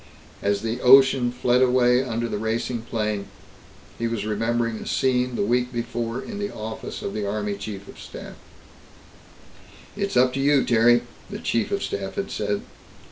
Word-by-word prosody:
As 100 +1 0
the 115 +2 -2
ocean 130 -1 +6
fled 125 0 +2
away 125 -1 +4
under 120 -2 -2
the 105 - -3
racing 115 +2 -2
plane, 105 -3 -2 0.7
he 115 - 0
was 115 -3 -3
remembering 115 +2 0
a - - -8
scene 125 -1 +1
the - - 0
week 125 +3 +1
before 120 0 -3
in 205 - -7
the 205 0 -3
office 110 +1 -6
of - - -3
the 105 -2 -2
Army 105 0 -2
Chief 100 -1 -7
of - - -12
Staff. - - -9 1.6
"It's 200 -7 -1
up 125 0 +4
to 135 - -2
you, 140 0 +3
Terry," 120 +1 +4 0.3
the - - -5
Chief 115 -2 -1
of 200 - -1
Staff 95 -1 -4
had 195 - -3
said. 105 -1 -2
120 Hz, 170 wpm, -24 LUFS, 110-125 Hz, 1.6 s, ocean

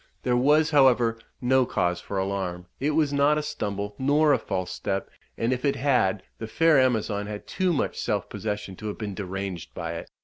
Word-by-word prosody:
There 125 - +2
was, 150 +5 +4
however, 125 -5 +4 0.2
no 130 +1 +4
cause 90 -7 -1
for 100 - -5
alarm; 95 -2 -2
it 150 +2 0
was 150 -3 +2
not 145 +2 +3
a 150 - -1
stumble, 105 -9 -3
nor 145 +3 +4
a - - +2
false 95 -1 -3
step; 95 +1 -3 0.3
and, 115 +3 +1
if 125 - -4
it 140 -1 +2
had, 125 -8 +1 0.2
the 110 - -5
fair 160 +4 +4
Amazon 110 -5 +1
had 105 -1 -6
too 185 -1 0
much 155 - -1
self - - -1
possession 105 -3 -4
to 110 - -6
have 105 - -4
been 105 -3 -4
deranged 95 -2 -5
by 85 -1 -4
it. 85 - -7
115 Hz, 200 wpm, -26 LUFS, 100-140 Hz, 0.3 s, was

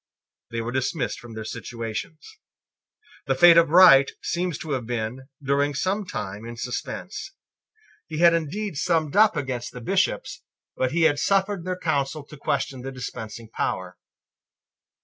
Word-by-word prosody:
They 115 0 -3
were 115 +1 -4
dismissed 130 +3 -2
from 120 -2 -11
their 110 -1 -6
situations. 115 - -6 0.9
The 135 - +2
fate 170 +5 +8
of 170 -1 +5
Wright 150 -6 +8
seems 175 -2 -1
to 160 -2 -7
have 125 -4 -2
been, 120 +2 -4 0.2
during 140 +1 +1
some 190 +7 -1
time, 105 - -5
in 115 0 -8
suspense. 125 - -5 0.7
He 155 - -5
had 170 +1 +6
indeed 170 +3 -2
summed 160 -1 0
up 210 -5 +5
against 130 -4 -3
the 125 - -7
Bishops: 115 - 0 0.3
but 130 -1 0
he 170 +1 +1
had 145 -2 +4
suffered 195 -2 +1
their 185 0 -2
counsel 150 -3 -1
to 150 - -13
question 135 -2 -2
the 135 +1 -6
dispensing 115 -3 -7
power. - - -3
140 Hz, 150 wpm, -24 LUFS, 120-170 Hz, 0.9 s, fate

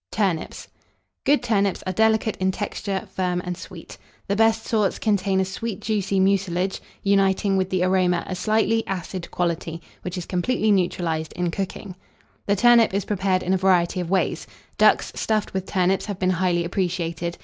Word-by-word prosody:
TURNIPS. 190 -7 -2 0.6
Good 280 -3 +4
turnips 200 -5 +1
are 185 - -2
delicate 220 +1 +2
in 190 0 +1
texture, 200 +1 -4
firm, 180 -2 -1
and 180 0 -3
sweet. - - -11 0.3
The 200 - 0
best 225 +1 +2
sorts 210 -4 +1
contain 195 -2 +1
a 190 - +2
sweet 195 +2 -5
juicy 200 -3 -1
mucilage, 190 -1 +1 0.2
uniting 195 0 +2
with 190 -1 0
the 185 -1 0
aroma 185 -2 +2
a - - -5
slightly 220 +4 +1
acid 185 -1 -5
quality, 170 -1 -2 0.2
which 180 +1 -5
is 175 - -4
completely 215 +4 0
neutralized 175 -4 0
in 175 -1 -1
cooking. 195 0 -5 0.5
The 200 - +3
turnip 235 -1 +5
is 200 - -1
prepared 190 -2 0
in 185 - 0
a - - +3
variety 185 -1 +2
of 175 -2 -3
ways. 190 0 0 0.3
Ducks - - +4
stuffed 215 -1 -1
with 190 -1 -3
turnips 190 +1 +1
have 205 -3 -4
been 185 0 +1
highly 175 -1 +1
appreciated. 170 -2 -2
190 Hz, 170 wpm, -23 LUFS, 180-205 Hz, 0.6 s, turnip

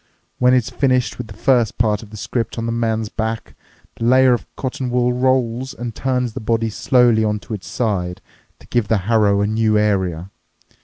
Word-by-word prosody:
When 125 +1 +5
it's 125 -3 0
finished 130 -3 0
with 125 - -5
the 105 - -11
first 120 -2 +2
part 105 -2 +1
of 110 - -12
the 105 - -10
script 115 +3 -3
on 115 - -2
the 115 - -1
man's 115 -1 -1
back, 110 +1 -4 0.4
the 115 - -3
layer 130 +1 +5
of 120 - -3
cotton 130 -1 -3
wool 125 0 +1
rolls 130 0 0
and 120 -1 -5
turns 125 -2 -1
the - - -5
body 115 0 0
slowly 120 0 +3
onto 105 +1 -2
its 100 -2 -6
side 100 -5 -2 0.4
to - - -18
give 120 -4 0
the 110 - +2
harrow 105 -3 +3
a - - +2
new 110 0 +1
area. 95 -4 0
115 Hz, 195 wpm, -19 LUFS, 105-125 Hz, 0.4 s, When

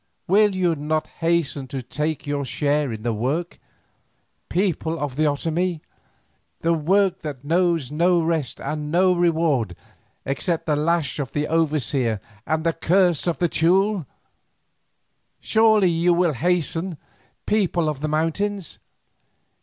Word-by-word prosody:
Will 205 +1 +4
you 180 -2 +2
not 155 +1 -1
hasten 165 -5 0
to 130 0 -5
take 150 +5 -3
your 145 -1 -2
share 145 0 0
in 110 -1 -6
the 120 -1 0
work, 140 +11 -2 0.9
people 165 -3 0
of 145 -4 -4
the 155 +2 +1
Otomie, 165 +3 -1 0.8
the 165 +1 +2
work 185 +4 +2
that 145 -6 -7
knows 165 -3 +1
no 170 +3 +3
rest 160 -5 -1
and 150 -1 -4
no 180 +2 +4
reward 160 - +1 0.5
except 155 +5 -1
the 150 - +1
lash 155 -2 0
of 135 -3 -4
the 145 0 0
overseer 145 -8 0 0.3
and 155 0 0
the 165 0 +1
curse 175 0 +2
of 170 -4 0
the 175 - +2
Teule? 185 +1 +2 1.3
Surely 220 -4 +4
you 170 +1 +2
will 175 -2 +2
hasten, 170 +3 -1 0.5
people 185 -6 +1
of 150 -3 -2
the 155 - -2
mountains! 165 +5 -2
165 Hz, 135 wpm, -23 LUFS, 145-175 Hz, 1.3 s, Will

